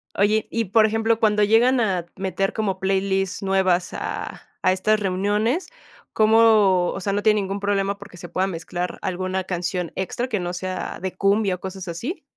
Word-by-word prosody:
Oye, 210 +2 +2
y 230 0 0
por 215 +3 +4
ejemplo, 225 +1 +1
cuando 210 -2 +3
llegan 235 +5 +4
a 190 -7 0
meter 195 0 -1
como 200 -4 -2
playlists 195 0 0
nuevas 185 -2 +1
a - - -5 0.2
a 185 - +4
estas 215 +3 +1
reuniones, 205 - 0 0.4
¿cómo? 215 -5 +4
O - - -5
sea, 200 +1 -2
¿no 205 +1 -1
tiene 215 -1 +4
ningún 195 +1 -3
problema 200 0 0
porque, 180 - -13
se 175 0 -9
pueda 185 +1 0
mezclar 175 0 -4
alguna 185 +1 -2
canción 180 -1 -3
extra 190 +6 -3
que 220 -5 -1
no 175 0 -3
sea 185 0 -4
de 190 -1 -4
cumbia 200 0 +2
o 180 - -13
cosas 190 -1 -7
así? 230 - -5
195 Hz, 180 wpm, -23 LUFS, 185-215 Hz, 0.4 s, por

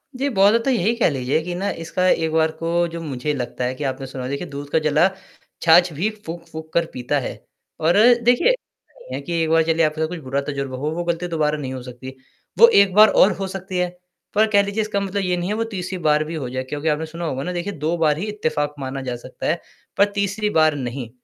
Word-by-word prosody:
जी, 270 +2 -1
बहुत 200 -3 +5
ज़्यादा 230 +1 +2
तो - - +2
यही 225 -1 +2
कह 230 - +3
लीजिए 135 +2 0
कि 175 - -2 0.3
इसका 185 +2 0
एक 160 -1 +1
बार 160 0 +2
को 170 +1 +1
जो 165 0 -7
मुझे 150 -1 -3
लगता 125 -2 -4
है 125 - -1
कि 145 - -6
आपने 135 -1 -3
सुना 130 -1 -7
होगा 130 - -4
देखिए 140 +5 -4
दूध 140 -1 -7
का 160 - +3
जला 155 +4 +3 0.5
छाछ 170 +2 +6
भी 185 +9 0 0.2
फूक-फूक 160 -1 -8
कर 170 0 +2
पीता 125 +4 -1
है 130 - -4 0.5
और 165 +4 +3 0.3
देखिए 245 - +4
ऐसा - - -5
नहीं - - -7
है - - -4
कि 170 -2 -2
एक 160 - -1
बार 165 0 +4
चलिए 165 0 +2
आपके 155 +1 -2
साथ 160 - +1
कुछ 180 0 -6
बुरा 140 -1 -2
तजुर्बा 140 -2 -4
हो 150 +4 -2
वो 175 +2 -3
गलती 170 +1 -2
दोबारा 150 -3 0
नहीं 130 -3 -5
हो 130 - -6
सकती 125 +1 -10
है। 130 - -7 0.5
वो 465 - +10
एक 200 - +5
बार 215 +1 +8
और 195 - +5
हो 195 - -1
सकती 190 0 -5
है। 180 0 +1 0.5
पर 215 +1 +4
कह 200 -1 +5
लीजिए 200 +2 -2
इसका 210 -1 -1
मतलब 200 0 -2
ये 180 -1 0
नहीं 175 +2 -2
है 210 - 0
कि - - -4
वो 230 - +1
तीसरी 185 -2 -4
बार 155 -3 +2
भी 160 +2 -6
हो 130 -5 -4
जाए। 130 +1 -3
क्योंकि 145 +4 -5
आपने 155 +1 0
सुना 165 +2 -6
होगा 135 -3 -3
ना 180 - -3
देखिए 180 +3 -3
2 155 +3 -1
बार 155 -3 +2
ही 180 - -3
इत्तेफाक 150 -7 -1
माना 135 0 -4
जा 125 -2 -3
सकता 125 +2 -9
है 170 +2 0 0.4
पर 200 - +6
तीसरी 200 +1 0
बार 155 -4 +3
नहीं। 125 -3 -5
160 Hz, 260 wpm, -21 LUFS, 145-185 Hz, 0.5 s, वो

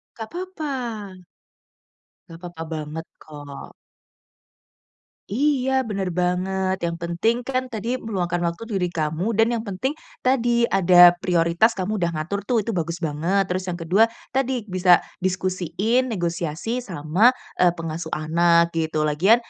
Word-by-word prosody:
Nggak 225 -1 -7
papa. 360 -3 -5 1.6
Nggak 165 0 -11
papa 175 -2 -7
banget, 155 +1 -5
kok. 145 -2 -10 1.6
Iya, 265 +2 +1
bener 200 -4 -3
banget. 185 +2 -1
Yang 170 - -4
penting 175 +8 +1
kan 255 0 -2
tadi 235 +3 -3
meluangkan 180 -5 -2
waktu 170 +6 -6
diri 195 -6 -1
kamu, 170 +6 -2
dan 225 +1 +3
yang 235 - -1
penting 240 +9 -2 0.3
tadi 240 -2 +3
ada 180 -4 +7
prioritas 175 +5 +2
kamu 200 +2 -2
udah 170 -1 +1
ngatur 175 +6 -2
tuh, 250 - +2
itu 230 - -2
bagus 170 -3 -2
banget. 170 +4 0
Terus 185 0 -3
yang 175 - -2
ke-2, 185 +7 +3 0.2
tadi 260 -3 0
bisa 185 -3 +4 0.2
diskusiin, 185 +6 0
negosiasi 175 +3 -2
sama, 180 0 +2 0.3
eee, 180 -1 +5
pengasuh 165 0 -5
anak, 170 +2 +3
gitu. 160 -2 -1
Lagian, 160 +9 +4
185 Hz, 130 wpm, -23 LUFS, 170-225 Hz, 1.6 s, ada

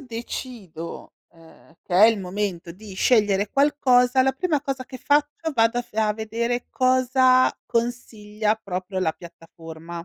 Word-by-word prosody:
decido, 230 - -8 0.2
ehm, 165 -1 -20
che 175 - -5
è 200 +4 +8
il 225 -2 +2
momento 185 -2 -4
di 200 +2 -12
scegliere 205 -1 +2
qualcosa, 260 -3 +3
la 265 +1 +2
prima 310 +1 -1
cosa 270 -2 -4
che 255 - -10
faccio 295 +4 0
vado 230 0 +2
a - - -1
f 235 - -27
a 215 -1 +1
vedere 230 +3 -3
cosa 255 0 +3
consiglia 220 -3 -2
proprio 185 -2 -5
la 175 -4 0
piattaforma. 165 0 -11
225 Hz, 145 wpm, -23 LUFS, 190-255 Hz, 0.2 s, è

